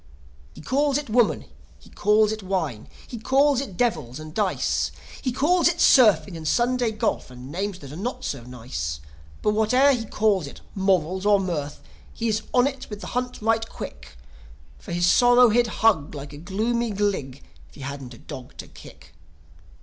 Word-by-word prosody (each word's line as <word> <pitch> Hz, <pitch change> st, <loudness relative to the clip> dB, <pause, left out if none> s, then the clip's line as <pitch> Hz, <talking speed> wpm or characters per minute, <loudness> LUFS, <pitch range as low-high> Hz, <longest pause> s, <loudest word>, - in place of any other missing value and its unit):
He -, -, -11 dB
calls 280 Hz, -, +1 dB
it 295 Hz, -6 st, -5 dB
"Woman," 240 Hz, -1 st, +2 dB, 0.3 s
he -, -, -19 dB
calls 210 Hz, +1 st, +3 dB
it 220 Hz, 0 st, -4 dB
"Wine," 175 Hz, -, -3 dB, 0.2 s
he 235 Hz, -, -7 dB
calls 275 Hz, +3 st, +3 dB
it 200 Hz, -10 st, -7 dB
"Devils" 155 Hz, -, -1 dB
and 155 Hz, 0 st, -9 dB
"Dice"; 200 Hz, -1 st, 0 dB, 0.3 s
He 255 Hz, -, -1 dB
calls 325 Hz, +7 st, +3 dB
it 345 Hz, -1 st, +1 dB
"Surfing" 195 Hz, -, +5 dB
and 160 Hz, -1 st, -6 dB
"Sunday 245 Hz, +4 st, +2 dB
Golf' 215 Hz, -9 st, -2 dB
and 125 Hz, +2 st, -10 dB
names 195 Hz, +3 st, -3 dB
that 140 Hz, -5 st, -11 dB
are -, -, -8 dB
not 225 Hz, +9 st, -4 dB
so -, -, -3 dB
nice. 115 Hz, -12 st, -5 dB, 0.4 s
But 210 Hz, -, +2 dB
whatever 250 Hz, +6 st, +4 dB
he 230 Hz, -3 st, -2 dB
calls 205 Hz, -7 st, +1 dB
it -, -, -12 dB
"Morals" 190 Hz, -2 st, +1 dB
or 205 Hz, -1 st, +4 dB
"Mirth" 160 Hz, -6 st, -3 dB, 0.3 s
he 230 Hz, -, -3 dB
is 220 Hz, 0 st, 0 dB
on 245 Hz, 0 st, +4 dB, 0.2 s
with 210 Hz, -1 st, -7 dB
the -, -, -7 dB
hunt 250 Hz, -2 st, -3 dB
right 225 Hz, 0 st, +1 dB
quick -, -, -9 dB, 0.6 s
For -, -, -10 dB
his 175 Hz, 0 st, +1 dB
sorrow 245 Hz, +5 st, +6 dB
he'd 240 Hz, +2 st, +3 dB
hug 210 Hz, -10 st, +1 dB
like 140 Hz, 0 st, -8 dB
a -, -, -9 dB
gloomy 225 Hz, +6 st, -1 dB
Gllig 190 Hz, -10 st, -2 dB, 0.3 s
if -, -, -21 dB
he 140 Hz, -, -12 dB
hadn't 135 Hz, -2 st, -7 dB
a -, -, -15 dB
dog 125 Hz, +2 st, -10 dB
to -, -, -8 dB
kick. -, -, -15 dB
205 Hz, 180 wpm, -24 LUFS, 155-240 Hz, 0.6 s, sorrow